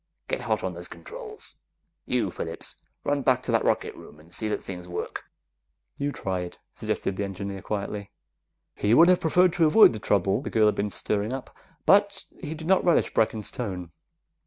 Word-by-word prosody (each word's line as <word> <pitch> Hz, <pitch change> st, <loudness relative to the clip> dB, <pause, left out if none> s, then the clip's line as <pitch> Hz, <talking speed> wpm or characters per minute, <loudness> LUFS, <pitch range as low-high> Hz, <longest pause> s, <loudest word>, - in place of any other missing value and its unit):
"Get -, -, -1 dB
hot -, -, -1 dB
on -, -, -2 dB
those -, -, -7 dB
controls. 445 Hz, -3 st, -8 dB, 0.5 s
You, -, -, +1 dB
Phillips! -, -, -5 dB, 0.3 s
Run 145 Hz, 0 st, +1 dB
back 130 Hz, -1 st, +2 dB
to 125 Hz, -, -2 dB
that 115 Hz, -1 st, +3 dB
rocket -, -, +1 dB
room 75 Hz, -, -13 dB
and 85 Hz, +3 st, -13 dB
see 110 Hz, +3 st, -1 dB
that 105 Hz, -, -2 dB
things 90 Hz, -2 st, -7 dB
work!" 90 Hz, -, -5 dB, 0.7 s
"You 145 Hz, 0 st, -2 dB
try 95 Hz, -8 st, -2 dB
it," 90 Hz, 0 st, -6 dB, 0.2 s
suggested 95 Hz, -, -2 dB
the 100 Hz, -, -1 dB
engineer 100 Hz, 0 st, -5 dB
quietly. 100 Hz, 0 st, -4 dB, 0.6 s
He 105 Hz, +3 st, +2 dB
would 170 Hz, +5 st, +8 dB
have 185 Hz, -, +5 dB
preferred 180 Hz, +2 st, +4 dB
to 165 Hz, -2 st, +4 dB
avoid 185 Hz, -, +7 dB
the 110 Hz, -, -5 dB
trouble 100 Hz, +2 st, +2 dB
the -, -, -5 dB
girl 110 Hz, -1 st, +3 dB
had 105 Hz, -, +4 dB
been 105 Hz, +1 st, -1 dB
stirring 105 Hz, +3 st, -1 dB
up, 135 Hz, -1 st, -7 dB, 0.3 s
but 200 Hz, +1 st, +4 dB, 0.2 s
he 160 Hz, -2 st, -4 dB
did 160 Hz, 0 st, -8 dB
not 190 Hz, +2 st, +4 dB
relish 175 Hz, -, +3 dB
Brecken's 110 Hz, -1 st, +1 dB
tone. 90 Hz, -8 st, -5 dB
110 Hz, 190 wpm, -26 LUFS, 100-160 Hz, 0.7 s, would